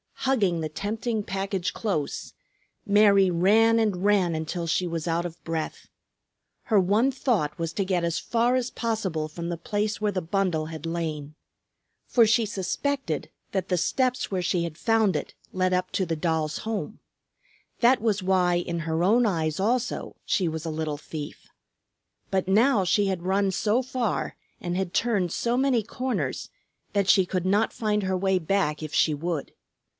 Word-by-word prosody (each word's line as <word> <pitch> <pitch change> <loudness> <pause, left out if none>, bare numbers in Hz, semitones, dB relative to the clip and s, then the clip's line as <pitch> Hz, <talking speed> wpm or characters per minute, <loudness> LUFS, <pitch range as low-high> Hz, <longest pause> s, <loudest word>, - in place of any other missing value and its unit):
Hugging 200 -11 +2
the 155 - -2
tempting 215 +6 -2
package 195 -1 -2
close, 180 -10 -3 0.5
Mary 200 -2 +5
ran 220 +6 +4
and 205 -5 0
ran 200 -4 +3
until 160 +2 -3
she 165 +2 0
was 165 -1 -3
out 170 +1 0
of 170 -1 -8
breath. 165 -1 -4 0.8
Her 215 -5 +4
one 210 +8 +3
thought 230 - 0
was 165 -1 -3
to 195 - -1
get 185 -2 0
as 170 -1 0
far 235 +2 +1
as 255 -1 0
possible 195 -9 -2
from 170 +2 -6
the 170 - -3
place 210 +3 -2
where 210 -1 +1
the 185 -1 -2
bundle 175 -3 0
had 160 -1 -7
lain. 155 -3 -4 0.7
For 235 -2 +5
she 225 +1 +3
suspected 205 - -2 0.2
that 190 -1 -2
the 180 - +2
steps 255 +8 0
where 185 -2 -1
she 175 0 +1
had 165 -2 -5
found 225 -3 +2
it - - -3 0.2
led 185 0 +1
up 180 0 0
to 190 - +1
the 165 -1 -2
doll's 155 -1 -1
home. 220 -1 -4 0.8
That 250 +2 +5
was 210 -4 0
why 185 -2 +3
in 170 -1 -2
her 165 0 -1
own 230 +6 +4
eyes 160 -6 0
also 240 +5 -1
she 185 -5 +1
was 160 0 -4
a 165 - -2
little 155 -1 -3
thief. 150 0 -8 0.8
But 190 -1 0
now 215 +2 +4
she 195 +3 +2
had 185 -3 -2
run 195 +2 +1
so 210 +5 +1
far 255 -3 -2 0.2
and 175 0 -3
had 190 -2 -2
turned 205 -7 +1
so 235 +6 0
many 260 -3 +3
corners 255 +3 -3 0.4
that 200 -2 +1
she 190 - +6
could 180 0 -2
not 205 +4 +2
find 210 -2 0
her 190 0 0
way 190 0 +2
back 165 -3 0
if 155 -1 -6
she 155 - +3
would. 165 0 -3
190 Hz, 175 wpm, -26 LUFS, 170-215 Hz, 0.8 s, she